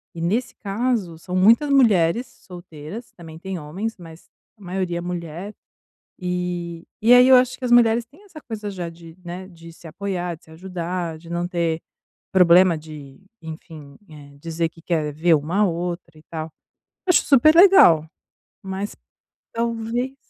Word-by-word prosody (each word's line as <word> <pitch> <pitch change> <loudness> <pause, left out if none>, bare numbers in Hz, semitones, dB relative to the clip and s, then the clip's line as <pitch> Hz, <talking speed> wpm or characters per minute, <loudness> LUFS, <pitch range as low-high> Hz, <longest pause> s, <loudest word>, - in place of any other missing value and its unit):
E, 165 - -6
nesse 210 +9 -1
caso, 205 -5 -2
são 180 +1 -6
muitas 230 +10 +4
mulheres 230 -3 +3 0.2
solteiras. 175 +4 -10
Também 160 -2 -12
têm 190 0 -5
homens, 195 +10 -5
mas 165 -2 -14 0.3
a - - -24
maioria 180 -1 -3
é - - -5
mulher, 175 +3 -6 0.7
e 180 -2 -4 0.2
aí 245 +2 +7
eu 260 - +8
acho 255 0 +1
que 255 - -6
as 240 - -2
mulheres 235 -1 +4
têm 305 - -21
essa 325 -6 -12
coisa 215 -3 -6
já, 180 -3 -5 0.4
né, 180 +2 -7
de 165 -1 -14
se 165 - -14
apoiar, 180 0 -4
de - - -27
se 160 - -18
ajudar, 175 -1 -5
de 165 +1 -15
não 170 0 -2
ter 170 -2 -1 0.5
problema 180 -1 +5
de 150 -2 -12 0.2
enfim, 155 -3 -10
eh, 145 -2 -14
dizer 165 +1 -2
que 165 - -19
quer 155 -4 -2
ver 165 +2 +3
uma 160 +7 -2
à - - +5
outra 170 -2 -4
e 155 - -18
tal. 160 -1 -6 0.6
Acho 360 - +4
super 310 +3 +5
legal, 340 - +7 0.6
mas 195 +2 -5 0.6
talvez 235 +3 -2
180 Hz, 160 wpm, -22 LUFS, 165-220 Hz, 0.7 s, eu